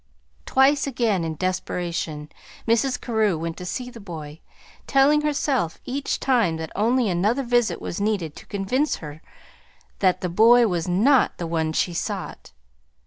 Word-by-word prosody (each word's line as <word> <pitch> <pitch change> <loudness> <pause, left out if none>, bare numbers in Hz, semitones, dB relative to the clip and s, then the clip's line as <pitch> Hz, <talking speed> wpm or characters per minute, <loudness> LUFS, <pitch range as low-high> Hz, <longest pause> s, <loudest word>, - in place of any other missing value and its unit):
Twice 275 +2 +3
again 230 -9 0
in 160 -1 -3
desperation 170 -3 -3 0.4
Mrs. 235 +3 +2
Carew 220 -7 0
went 165 +1 -4
to 180 - -7
see 250 +6 -4
the 235 - -11
boy, 160 -6 -8 0.5
telling 285 +2 +4
herself 280 - -1
each 275 +2 -2
time 230 -11 +2
that 160 -1 -6
only 235 +3 +2
another 205 +9 +1
visit 240 -7 +1
was 175 - -5
needed 200 -8 -1
to - - -13
convince 245 +9 0
her 150 0 -10 0.8
that 185 -2 +2
the 180 - -1
boy 230 +7 +5
was 175 -5 -1
not 235 +10 +3
the 175 - -4
one 160 -1 -1
she 175 +2 0
sought. 165 - -5
200 Hz, 150 wpm, -23 LUFS, 170-250 Hz, 0.8 s, boy